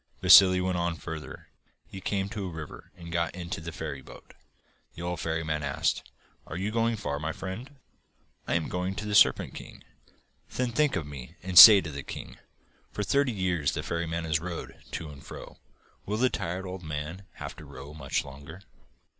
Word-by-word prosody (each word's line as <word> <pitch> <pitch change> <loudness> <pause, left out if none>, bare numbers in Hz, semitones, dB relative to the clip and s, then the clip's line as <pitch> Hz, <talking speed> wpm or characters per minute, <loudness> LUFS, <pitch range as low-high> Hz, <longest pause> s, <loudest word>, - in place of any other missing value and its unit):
Vassili 95 0 +8
went 90 -1 -1
on 85 -1 -1
further. 80 -1 -8 0.4
He 95 - -10
came 95 +1 -1
to 100 -3 -4
a - - -4
river 80 -3 -9
and 85 -1 -10
got 85 0 -1
into 90 -2 -5
the 85 +1 -6
ferryboat. 75 -5 -8 0.6
The 85 - -7
old 90 -1 -3
ferryman 80 -2 -2
asked: 70 -1 -1 0.4
'Are 80 - -6
you 100 +3 -2
going 115 +1 +1
far, 70 -9 -3
my 75 +2 -2
friend?' 115 - -7 0.7
'I - - 0
am 85 -2 0
going 90 +1 -3
to 105 - -5
the 105 - -3
Serpent 105 - +4
King.' - - -11 0.7
'Then 125 -1 -1
think 150 +1 +2
of 90 -5 -2
me 70 +2 -10
and 95 0 -5
say 100 +2 +12
to 80 - -6
the 70 0 -6
king: - - -9 0.5
"For 105 - -3
thirty 140 +6 +2
years 90 -8 0
the - - -3
ferryman 85 0 -3
has 80 -1 +1
rowed 85 0 -6 0.2
to 80 - -4
and 70 -1 -13
fro. - - -11 0.5
Will 105 +2 -1
the 125 +2 +2
tired 90 +3 -3
old 95 0 -6
man 80 +4 -6
have - - -8
to - - -10
row 70 +3 -10
much 70 -4 -2
longer?" 70 +7 -11
85 Hz, 190 wpm, -28 LUFS, 80-95 Hz, 0.7 s, say